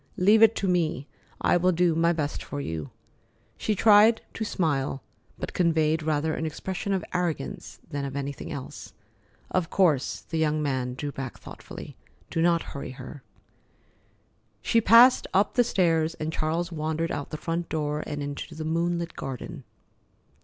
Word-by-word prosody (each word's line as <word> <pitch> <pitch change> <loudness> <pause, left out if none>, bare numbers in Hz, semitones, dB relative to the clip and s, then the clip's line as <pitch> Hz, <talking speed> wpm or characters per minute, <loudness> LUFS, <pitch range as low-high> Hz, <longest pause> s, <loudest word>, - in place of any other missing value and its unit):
Leave 210 +4 +5
it 225 0 +7
to 195 - -1
me. 165 -6 0 0.4
I - - +4
will 180 +1 +3
do 175 -1 +2
my 165 +1 +3
best 150 -3 -2
for 145 - -6
you." 80 - -4 0.7
She 215 - -1
tried 215 +2 +6
to 225 - -3
smile, 145 -9 -1 0.3
but - - -5
conveyed 160 -2 +2
rather 155 0 0
an - - -3
expression 185 +5 -4
of 190 -1 0
arrogance 170 - -3
than 145 -1 -4
of 135 -1 -5
anything 140 +1 -5
else. 140 -4 -8 0.6
"Of 175 -3 0
course." 160 -9 +2
The 160 - -4
young 155 -1 +1
man 130 -4 -1
drew 145 +2 -4
back 135 -2 -6
thoughtfully. - - -10 0.3
"Do 165 - 0
not 170 0 +3
hurry 140 -2 -6
her." 130 +2 -10 1.4
She 230 - +3
passed 235 +4 +7
up 200 +2 +3
the 245 - +4
stairs, 165 -6 +1
and 155 +1 -4
Charles 165 +3 -1
wandered 160 +1 -2
out 145 - -4
the 155 - -5
front 165 +2 -3
door 150 -1 -2
and 145 -1 -4
into 145 +3 -6
the 155 0 -5
moonlit 170 +1 -1
garden. 130 -4 -6
160 Hz, 160 wpm, -26 LUFS, 145-175 Hz, 1.4 s, it